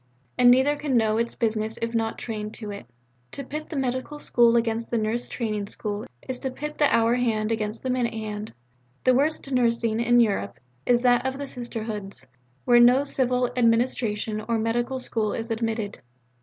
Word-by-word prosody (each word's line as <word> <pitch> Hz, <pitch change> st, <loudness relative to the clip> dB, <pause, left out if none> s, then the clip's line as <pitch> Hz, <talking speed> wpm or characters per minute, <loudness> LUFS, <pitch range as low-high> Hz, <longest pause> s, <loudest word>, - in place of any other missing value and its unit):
And 245 Hz, 0 st, +6 dB
neither 265 Hz, +4 st, +5 dB
can 285 Hz, -4 st, 0 dB
know 220 Hz, -1 st, +2 dB
its 235 Hz, 0 st, -1 dB
business 220 Hz, 0 st, -1 dB
if 230 Hz, 0 st, -3 dB
not 225 Hz, -1 st, -1 dB
trained 215 Hz, -2 st, -5 dB
to 210 Hz, -3 st, -6 dB
it. 200 Hz, -12 st, -8 dB, 0.5 s
To 280 Hz, -, -5 dB
pit 305 Hz, +3 st, -6 dB
the 320 Hz, -, -6 dB
medical 260 Hz, +2 st, -2 dB
school 235 Hz, -4 st, +3 dB
against 230 Hz, 0 st, 0 dB
the 235 Hz, -, 0 dB
nurse 225 Hz, +2 st, -1 dB
training 215 Hz, -4 st, -3 dB
school 205 Hz, 0 st, -5 dB, 0.2 s
is 255 Hz, -1 st, -4 dB
to 265 Hz, -, -3 dB
pit 300 Hz, +4 st, -6 dB
the 295 Hz, -, +4 dB
hour 230 Hz, +1 st, +3 dB
hand 225 Hz, -3 st, 0 dB
against 215 Hz, 0 st, -3 dB
the 260 Hz, -, -1 dB
minute 245 Hz, -2 st, -1 dB
hand. 215 Hz, -1 st, -5 dB, 0.5 s
The 255 Hz, -, +5 dB
worst 280 Hz, +1 st, 0 dB
nursing 230 Hz, -3 st, +1 dB
in 240 Hz, +1 st, +4 dB
Europe 195 Hz, -, +1 dB, 0.3 s
is 245 Hz, 0 st, +3 dB
that 245 Hz, -1 st, +4 dB
of 265 Hz, 0 st, -2 dB
Sisterhoods, 220 Hz, -, -5 dB, 0.4 s
where 240 Hz, -1 st, +6 dB
no 250 Hz, +3 st, +6 dB
civil 250 Hz, -3 st, 0 dB
administration 230 Hz, -3 st, +1 dB
or 230 Hz, -, +2 dB
medical 240 Hz, +3 st, -1 dB
school 220 Hz, -4 st, 0 dB
is 230 Hz, +1 st, -4 dB
admitted. 225 Hz, -2 st, -2 dB
235 Hz, 180 wpm, -25 LUFS, 220-250 Hz, 0.5 s, And